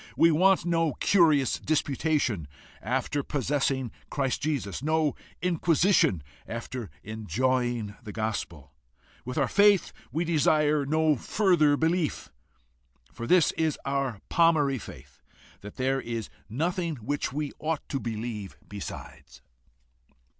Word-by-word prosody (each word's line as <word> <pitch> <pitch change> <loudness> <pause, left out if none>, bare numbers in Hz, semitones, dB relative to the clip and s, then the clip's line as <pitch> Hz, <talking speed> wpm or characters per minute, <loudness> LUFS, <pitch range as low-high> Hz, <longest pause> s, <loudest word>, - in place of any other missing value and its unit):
We 165 - +6
want 185 +3 +4
no 165 -3 +1
curious 155 - +3
disputation 145 - 0 0.3
after 145 - -1
possessing 135 -3 -1 0.2
Christ 135 -3 -1
Jesus, 135 -10 -2
no 155 0 +1 0.3
inquisition 170 - +3 0.2
after 115 0 -5
enjoying 115 +1 -1
the 110 -3 -8
gospel! 85 -10 -4 0.5
With 125 +3 -5
our 135 -3 +2
faith 200 +2 +4 0.2
we 165 +3 -1
desire 150 -2 +2
no 155 0 +3
further 155 - +3
belief. 160 0 0 0.8
For 115 - -6
this 180 0 +5
is 160 -2 -1
our 140 -6 -1
palmary 150 -7 +3
faith, - - -12 0.4
that 105 +1 -10
there 135 +1 0
is 115 -3 -5 0.2
nothing 170 - -1
which 140 +4 -3
we 145 +1 -3
ought 155 -1 -2
to 135 - -1
believe 110 -3 -5
besides." 100 -1 -9
140 Hz, 115 wpm, -27 LUFS, 120-160 Hz, 0.8 s, We